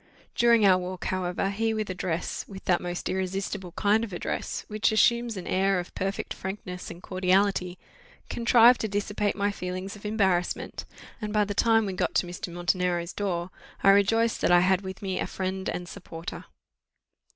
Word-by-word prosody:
During 235 Hz, -2 st, +4 dB
our 185 Hz, -2 st, +6 dB
walk, 180 Hz, 0 st, -5 dB
however, 185 Hz, +1 st, -1 dB
he 220 Hz, +2 st, 0 dB
with 215 Hz, -3 st, -2 dB
address 180 Hz, -2 st, -3 dB
with 195 Hz, -1 st, -10 dB
that 175 Hz, -1 st, +2 dB
most 175 Hz, 0 st, -4 dB
irresistible 190 Hz, 0 st, -3 dB
kind 215 Hz, +2 st, +2 dB
of 225 Hz, -, -5 dB
address, 175 Hz, -, -4 dB
which 215 Hz, +1 st, +1 dB
assumes 235 Hz, 0 st, +3 dB
an 185 Hz, -, -6 dB
air 195 Hz, 0 st, +2 dB
of 175 Hz, -, -7 dB
perfect 195 Hz, +1 st, -3 dB
frankness 190 Hz, -1 st, -6 dB
and 175 Hz, -, -10 dB
cordiality, 185 Hz, -1 st, +1 dB, 0.5 s
contrived 235 Hz, +1 st, +5 dB
to 220 Hz, -, 0 dB
dissipate 205 Hz, 0 st, -1 dB
my 205 Hz, 0 st, 0 dB
feelings 185 Hz, +1 st, -5 dB
of 205 Hz, -, -14 dB
embarrassment; 195 Hz, -5 st, 0 dB, 0.4 s
and 210 Hz, -1 st, -3 dB
by 210 Hz, -1 st, +3 dB
the 205 Hz, -, -3 dB
time 225 Hz, +1 st, +3 dB
we 195 Hz, -, -3 dB
got -, -, -1 dB
to -, -, +3 dB
Mr. 175 Hz, 0 st, -6 dB
Montenero's 175 Hz, 0 st, 0 dB
door, 185 Hz, -3 st, -2 dB, 0.3 s
I -, -, +7 dB
rejoiced 225 Hz, +3 st, +3 dB
that -, -, +3 dB
I 175 Hz, 0 st, +7 dB
had 185 Hz, +1 st, +3 dB
with 190 Hz, 0 st, -8 dB
me 190 Hz, -1 st, -2 dB
a -, -, -1 dB
friend 190 Hz, 0 st, -3 dB
and 180 Hz, -, -4 dB
supporter. 165 Hz, 0 st, -8 dB
190 Hz, 175 wpm, -27 LUFS, 180-210 Hz, 0.5 s, I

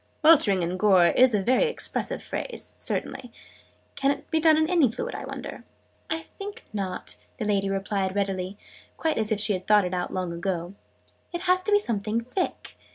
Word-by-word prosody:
"'Weltering 225 Hz, -, +6 dB
in 175 Hz, +2 st, -2 dB
gore' 185 Hz, -3 st, +5 dB
is 255 Hz, -3 st, +5 dB
a 200 Hz, -, 0 dB
very 255 Hz, -, +3 dB
expressive 470 Hz, -, 0 dB
phrase, -, -, -4 dB
certainly. 245 Hz, -2 st, -3 dB, 0.6 s
Can 275 Hz, 0 st, +1 dB
it 280 Hz, +3 st, -3 dB
be 320 Hz, -, +2 dB
done 315 Hz, -1 st, +5 dB
in 315 Hz, 0 st, +2 dB
any 325 Hz, -9 st, +3 dB
fluid, 470 Hz, -, -5 dB
I -, -, -6 dB
wonder?" -, -, -7 dB, 0.5 s
"I 320 Hz, +1 st, -1 dB
think 410 Hz, +3 st, -9 dB
not," 185 Hz, -, -3 dB, 0.2 s
the -, -, -3 dB
lady 200 Hz, -2 st, +1 dB
readily 195 Hz, 0 st, -1 dB
replied 195 Hz, -1 st, -2 dB, 0.4 s
quite 320 Hz, -6 st, 0 dB
as 220 Hz, 0 st, 0 dB
if 215 Hz, -, +1 dB
she 210 Hz, 0 st, +2 dB
had 185 Hz, -1 st, -5 dB
thought 210 Hz, -2 st, +5 dB
it 180 Hz, -, -4 dB
out, 180 Hz, -1 st, -2 dB
long 185 Hz, -2 st, -3 dB
ago. 175 Hz, 0 st, -3 dB, 0.6 s
"It 345 Hz, -1 st, -4 dB
has 365 Hz, 0 st, +2 dB
to 420 Hz, -, -2 dB
be 410 Hz, -, +7 dB
something 225 Hz, -, -1 dB
thick. 255 Hz, +11 st, -4 dB
215 Hz, 190 wpm, -26 LUFS, 190-315 Hz, 0.6 s, be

